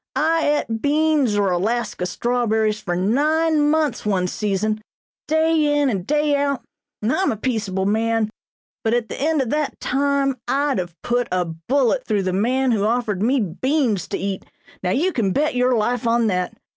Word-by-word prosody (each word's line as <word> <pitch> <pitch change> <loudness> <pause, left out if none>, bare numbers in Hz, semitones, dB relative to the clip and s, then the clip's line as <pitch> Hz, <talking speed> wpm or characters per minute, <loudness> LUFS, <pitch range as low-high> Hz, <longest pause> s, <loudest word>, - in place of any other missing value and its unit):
I 325 +1 +2 0.2
et 225 -1 -3
beans 295 -5 +2
or 200 -2 +2
'Alaska 195 0 -1
strawberries' 220 0 0
for 175 -4 -2
nine 295 - +2
months 305 -5 +1
one 195 -3 +1
season, 210 +3 -1 0.5
day 315 0 +2 0.2
in 280 -3 +2
and 190 -2 -3
day 295 0 +2
out, 280 -2 -1 0.4
and 225 - +1
I'm 380 0 +1
a 220 - -3
peaceable 205 -5 -2
man, 220 +1 +1 0.5
but 225 0 +2
at 240 -2 -1
the - - -6
end 305 -1 +2
of 235 - -5
that 300 -2 -1
time 275 0 0
I'd 275 0 +1
have 175 -2 -6
put 245 -1 0
a 180 -1 +1
bullet 245 - 0
through 210 -3 +1
the 185 -1 -1
man 250 +6 +1
who 215 -3 +1
offered 220 -3 0
me 255 +5 +2
beans 225 - 0
to - - -3
eat, 195 -1 -3 0.4
now - - -1
you 330 - +1
can 195 -6 0
bet 300 0 +1
your 250 0 +2
life 235 +2 0
on 230 0 +2
that! 180 -4 -1
240 Hz, 180 wpm, -21 LUFS, 205-280 Hz, 0.5 s, I